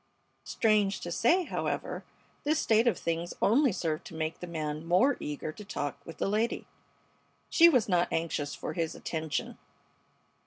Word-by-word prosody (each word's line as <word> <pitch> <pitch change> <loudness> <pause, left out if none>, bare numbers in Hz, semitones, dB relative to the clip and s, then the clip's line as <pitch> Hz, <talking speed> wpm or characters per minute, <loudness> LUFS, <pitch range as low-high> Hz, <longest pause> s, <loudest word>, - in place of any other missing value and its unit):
Strange 210 -3 +2
to 175 - -6
say, 335 - +3
however, - - -3 0.4
this 305 +2 +2
state 225 -4 +3
of 235 - +3
things 170 +1 -3
only 260 +5 +4
served 160 -4 -2
to - - -10
make 160 0 -3
the 180 - -6
man 155 -2 -3
more 180 +12 +3
eager 150 +1 -4
to 210 - -11
talk 145 -8 -4
with 165 - -8
the - - 0
lady. 215 +4 0 0.9
She 340 -1 +8
was 255 -9 +3
not 180 -3 +2
anxious 155 -3 -2
for - - -5
his 165 -2 -2
attention. 160 -2 -3
175 Hz, 160 wpm, -30 LUFS, 160-225 Hz, 0.9 s, She